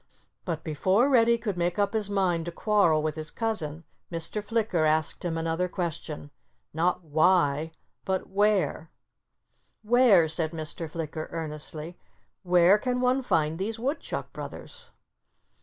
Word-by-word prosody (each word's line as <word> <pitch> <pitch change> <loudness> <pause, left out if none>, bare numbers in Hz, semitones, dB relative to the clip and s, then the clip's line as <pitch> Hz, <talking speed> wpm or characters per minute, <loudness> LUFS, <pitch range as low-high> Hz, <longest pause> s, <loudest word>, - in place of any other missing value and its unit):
But 160 -3 -3
before 190 - +2
Reddy 235 -3 +5
could 210 -5 -4
make 175 0 0
up 205 +1 +1
his 215 -2 -1
mind 180 -5 +1
to 175 - -4
quarrel 170 -6 +2
with 155 -1 -1
his 155 0 -5
cousin 165 -9 -3 0.3
Mr. 170 +5 -3
Flicker 215 -6 0
asked 155 0 +1
him 165 -2 -2
another 165 +2 -1
question—not 165 0 -4
"Why?" 160 -1 +2 0.3
but 190 -1 -2
"Where?" 195 -5 +1 0.9
"Where—" 220 -7 +5
said 160 +1 -1
Mr. 160 0 -5
Flicker 155 -1 -5
earnestly—"where 170 +4 -1
can 250 +2 -1
one 255 +1 +2
find 160 -8 0
these 220 +4 -2
Woodchuck 275 +7 -3
brothers?" 485 0 -9
175 Hz, 125 wpm, -27 LUFS, 160-210 Hz, 0.9 s, Reddy